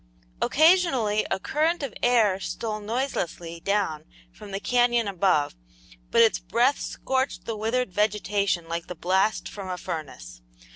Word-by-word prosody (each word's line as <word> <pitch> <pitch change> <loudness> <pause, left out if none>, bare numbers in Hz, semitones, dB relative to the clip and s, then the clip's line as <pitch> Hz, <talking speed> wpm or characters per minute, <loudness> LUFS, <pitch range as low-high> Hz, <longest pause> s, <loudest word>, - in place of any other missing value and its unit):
Occasionally 280 - +3
a 190 - -1
current 315 - 0
of 270 - -4
air 220 -6 +3
stole 215 +2 -4
noiselessly 205 -7 -3
down 195 -5 -1 0.3
from 205 - -12
the 195 0 -3
canyon 240 -1 +2
above, 185 -6 +1 0.6
but 230 - +5
its 225 - +3
breath 245 +5 +1
scorched 265 +1 -2
the 225 - -3
withered 225 0 -1
vegetation 200 -3 0
like 170 0 -4
the 180 - -6
blast 190 +5 +1
from 195 -2 -7
a 180 - -3
furnace. - - -7
210 Hz, 140 wpm, -25 LUFS, 185-245 Hz, 0.6 s, but